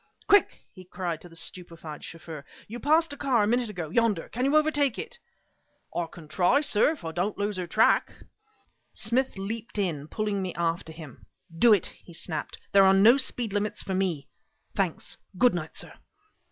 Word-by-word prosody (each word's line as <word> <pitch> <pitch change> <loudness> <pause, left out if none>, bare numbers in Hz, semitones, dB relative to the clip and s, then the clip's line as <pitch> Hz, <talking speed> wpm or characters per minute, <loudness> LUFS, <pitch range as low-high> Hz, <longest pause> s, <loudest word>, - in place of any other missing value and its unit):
"Quick!" 405 - +3
he 185 - -12
cried 180 -3 -4
to 175 - -12
the 165 - -16
stupefied 165 -3 -5
chauffeur 165 -3 -8 0.2
"You 235 +3 -7
passed 315 +3 +3
a - - -9
car 255 -6 +2
a - - +1
minute 240 0 +1
ago 175 -6 -5
yonder. 220 -5 +1
Can 250 +3 -2
you 280 +2 +2
overtake 295 -4 +2
it?" 485 - -7 0.8
"I 170 -1 -1
can 165 -3 -12
try, 180 - +3
sir, 295 +1 +3
if 305 - -11
I 160 - -3
don't 180 +5 -2
lose 205 0 -1
her 180 -1 -3
track." 215 +6 +3 0.8
Smith 255 0 -1
leaped 215 +3 -5
in, 160 -8 -1
pulling 210 +1 -2
me 185 -2 -4
after 165 -1 -1
him. 160 -5 -12 0.3
"Do 235 +7 +5
it!" 205 -5 +3
he 170 - -13
snapped. 160 -2 -4
"There 195 0 +7
are 190 0 +6
no 220 +7 +7
speed 245 -5 -1
limits 210 0 -1
for 190 - -3
me. 180 -7 -1 0.5
Thanks! - - -2 0.2
Goodnight, 175 -8 +2
sir!" - - -5
195 Hz, 180 wpm, -27 LUFS, 170-235 Hz, 0.8 s, There